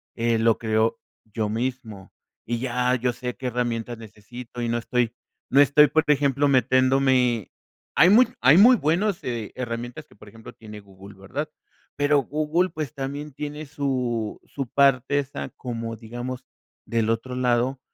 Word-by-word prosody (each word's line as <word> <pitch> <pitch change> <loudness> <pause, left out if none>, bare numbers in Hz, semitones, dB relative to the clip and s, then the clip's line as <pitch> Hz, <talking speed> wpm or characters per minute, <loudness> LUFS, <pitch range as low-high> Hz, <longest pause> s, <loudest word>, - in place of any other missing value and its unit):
eh, 115 -1 +1
lo 115 0 +3
creo 110 0 0 0.3
yo 110 -1 -3
mismo. 115 -4 -4 0.3
Y 120 0 -2
ya 125 0 0
yo 125 0 -1
sé 125 0 -5
qué 130 0 -5
herramientas 120 -1 -2
necesito, 115 +3 -10
y 120 - -1
no 120 - 0
estoy 120 0 -1 0.4
no 140 +2 +5
estoy, 145 +2 +6
por 155 +2 +2
ejemplo, 145 -1 +2
metiéndome 130 -2 +2 0.4
Hay 175 - +6
muy 235 +6 +6
hay 145 +5 +6
muy 240 +6 +8
buenos 180 +2 0
herramientas 120 +3 -5
que, - - -22
por 105 - -16
ejemplo, 110 +1 -12
tiene 105 -2 -11
Google, 100 0 -15
¿verdad? 145 +11 -5 0.5
Pero 145 0 +3
Google, 155 +6 0
pues, 155 -4 -5
también 145 +1 -5
tiene 150 +2 -6
su 130 -6 -2
su 135 -3 -5
parte 140 +1 +3
esa 140 -1 -5
como, 115 -2 -5
digamos, 120 +3 -7 0.4
del 115 -1 0
otro 115 +3 -2
lado, 125 +1 +1
125 Hz, 155 wpm, -24 LUFS, 115-140 Hz, 0.5 s, muy